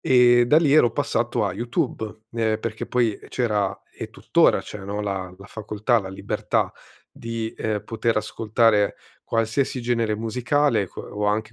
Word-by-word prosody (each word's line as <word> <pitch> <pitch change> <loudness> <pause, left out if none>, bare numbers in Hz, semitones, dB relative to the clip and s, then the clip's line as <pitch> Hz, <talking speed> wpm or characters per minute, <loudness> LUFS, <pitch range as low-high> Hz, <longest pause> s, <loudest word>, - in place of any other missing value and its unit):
e 120 -1 +5
da 150 - +5
lì 160 -4 +4
ero 135 -6 +6
passato 120 -4 0
a - - -1
YouTube. 110 -1 -3
Ehm, 110 -2 0
perché 110 -1 -4
poi 120 -4 +1
c'era 105 -5 0
e - - -7
tuttora - - +3
c'è, 105 - -8
no, 100 +1 -3
la 95 -2 -3
la 100 +1 -13
facoltà, 110 +3 0
la 95 - -7
libertà 95 - -1 0.4
di, 115 -1 -5
ehm, 105 -2 -2
poter 115 0 -1
ascoltare 110 -1 +2 0.3
qualsiasi 115 +3 0
genere 115 -3 0
musicale 125 - +1
que - - -9
o 105 0 -3
anche 105 +2 0
110 Hz, 155 wpm, -23 LUFS, 105-120 Hz, 0.4 s, ero